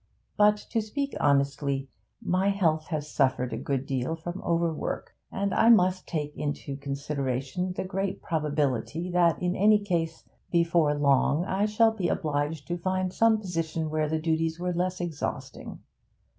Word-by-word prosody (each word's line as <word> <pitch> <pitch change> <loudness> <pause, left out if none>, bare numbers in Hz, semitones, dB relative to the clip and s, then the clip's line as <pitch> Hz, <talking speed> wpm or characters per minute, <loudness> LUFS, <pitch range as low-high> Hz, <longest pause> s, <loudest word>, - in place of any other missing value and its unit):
But, 210 0 +5
to 230 - +1
speak 275 +6 -3
honestly, 140 -1 +1 0.4
my 185 +2 +2
health 160 -6 +1
has 150 -3 -3
suffered 130 -4 +1
a - - -2
good 135 -1 -2
deal 135 +4 -1
from 175 +3 -6
overwork, 170 -2 -2 0.2
and 200 0 -1
I 230 - +4
must 185 -4 +4
take 150 -3 -3
into 145 -1 -4
consideration 140 +4 -3
the - - -3
great 195 +1 -2
probability 150 +1 -1
that 175 -2 +3
in 180 0 0
any 210 +2 +5
case, 170 -5 -2 0.3
before 170 -3 +3
long, 145 +3 +3
I 195 +2 +1
shall 225 +1 +4
be 200 -5 -2
obliged 150 -2 -1
to 175 0 -2
find 185 +1 -1
some 225 -1 +4
position 165 -5 -3
where 155 -1 0
the 160 - 0
duties 160 +1 0
were 180 0 -1
less 180 +1 -1
exhausting.' 165 -4 -5
165 Hz, 155 wpm, -27 LUFS, 145-185 Hz, 0.4 s, But